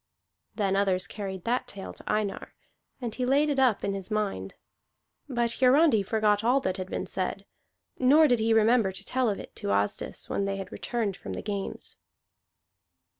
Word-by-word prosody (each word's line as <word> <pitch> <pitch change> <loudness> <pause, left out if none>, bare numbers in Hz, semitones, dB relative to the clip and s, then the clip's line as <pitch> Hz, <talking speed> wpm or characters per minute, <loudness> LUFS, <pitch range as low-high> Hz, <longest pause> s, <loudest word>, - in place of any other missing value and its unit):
Then 195 -3 +1
others 195 -1 +2
carried 195 -3 -6
that 245 +2 0
tale 195 -1 -7
to - - -14
Einar, 210 -2 -2 0.4
and 240 -4 -4
he 250 - -3
laid 285 +4 +3
it 275 - 0
up 250 -6 +3
in 200 - 0
his 195 0 -6
mind; 205 - -2 0.7
but 240 -2 -1
Hiarandi 260 -2 +5
forgot 210 +1 +1
all 250 +4 +4
that 185 -4 -2
had 185 0 -5
been - - -3
said, 195 +1 -3 0.5
nor 295 +5 +6
did 245 -4 +3
he 225 +1 +1
remember 225 -2 +4
to 195 +1 -9
tell 255 -2 +1
of 200 - -2
it - - -11
to - - -4
Asdis 100 +1 -1
when 200 - -1
they 195 0 -2
had 195 - -7
returned 220 -5 -2
from - - -7
the - - -5
games. 200 -2 -5
210 Hz, 180 wpm, -28 LUFS, 195-245 Hz, 0.7 s, nor